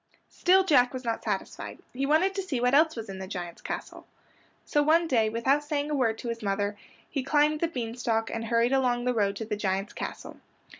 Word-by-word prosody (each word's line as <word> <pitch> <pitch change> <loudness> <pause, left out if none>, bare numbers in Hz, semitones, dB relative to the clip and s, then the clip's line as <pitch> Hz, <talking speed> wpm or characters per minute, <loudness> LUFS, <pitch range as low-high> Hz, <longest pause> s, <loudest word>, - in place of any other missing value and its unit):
Still 380 +2 +4
Jack 260 -8 +4
was 255 - -5
not 230 -1 -2
satisfied. 200 -3 -4 0.2
He 270 +2 -1
wanted 330 +6 +3
to 390 - -2
see 330 -10 -3
what 250 +1 +2
else 315 +2 +5
was 225 -2 -6
in 190 -1 -7
the 190 - -6
giant's 175 -3 -6
castle. - - -6 0.6
So 295 - +2
one 325 +3 +4
day, 225 -6 +2
without 265 +6 +1
saying 295 0 -2
a - - +1
word 230 -5 +1
to 235 - -5
his 230 0 -4
mother, 205 0 -1 0.3
he 275 - -2
climbed 300 +3 +2
the 335 - +1
bean 240 -8 -4
stalk 225 -2 -1
and 225 0 -3
hurried 235 +2 +2
along 250 -2 +1
the 250 - +2
road 200 -3 +1
to 225 - -5
the 210 - -2
giant's 195 -1 -2
castle. - - -6
245 Hz, 220 wpm, -28 LUFS, 220-295 Hz, 0.6 s, else